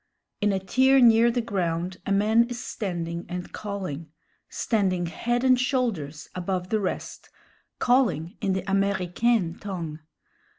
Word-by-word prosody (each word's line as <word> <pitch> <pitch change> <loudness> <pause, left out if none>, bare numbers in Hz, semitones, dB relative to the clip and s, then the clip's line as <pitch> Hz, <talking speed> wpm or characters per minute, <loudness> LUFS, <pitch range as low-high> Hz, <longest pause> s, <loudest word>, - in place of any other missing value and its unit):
In 205 0 +3
a 195 - +1
tier 260 +8 +4
near 235 -1 +6
the 240 +1 0
ground 180 -4 -2
a - - -1
man 215 +4 +4
is 245 - -4
standing 175 -8 -4
and 180 0 -6
calling 185 -7 -5 0.4
standing 190 -6 0
head 240 +9 -1
and 255 -1 +5
shoulders 220 - -1
above 180 0 -3
the 220 - +1
rest 195 - -4 0.5
calling 210 - +2
in 195 - +1
the 190 -1 -2
Américaine 195 0 +1
tongue. 170 -6 -5
195 Hz, 135 wpm, -26 LUFS, 175-235 Hz, 0.5 s, near